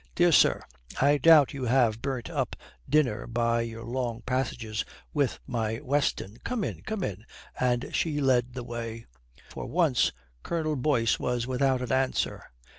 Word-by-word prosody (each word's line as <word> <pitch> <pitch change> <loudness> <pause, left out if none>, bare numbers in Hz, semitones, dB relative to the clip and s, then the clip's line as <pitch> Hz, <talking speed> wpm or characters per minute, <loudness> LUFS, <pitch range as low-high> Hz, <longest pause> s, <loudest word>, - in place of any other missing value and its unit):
"Dear - - +4
sir, - - +5 0.4
I 145 +2 +4
doubt 155 -1 +6
you 135 -2 -4
have 115 -3 +2
burnt 130 -3 -3
up - - -2 0.3
dinner 130 -8 +2
by 115 0 +1
your 115 0 -5
long 120 -1 -3
passages 120 -4 -2 0.3
with 145 -4 +1
my 115 -3 -2
Weston. 140 -7 -1
Come 240 -4 -2
in, - - -4
come 215 -3 -4
in," 100 - -4 0.4
and 125 -1 0
she 150 -3 0
led 125 -3 +2
the 125 - -4
way. 115 -1 -6 0.5
For - - -6
once 160 -7 +2 0.3
Colonel 155 -2 -1
Boyce 125 -4 +1
was 120 -1 -1
without 130 0 +1
an 125 - -4
answer. 130 0 0
125 Hz, 155 wpm, -28 LUFS, 115-140 Hz, 0.5 s, doubt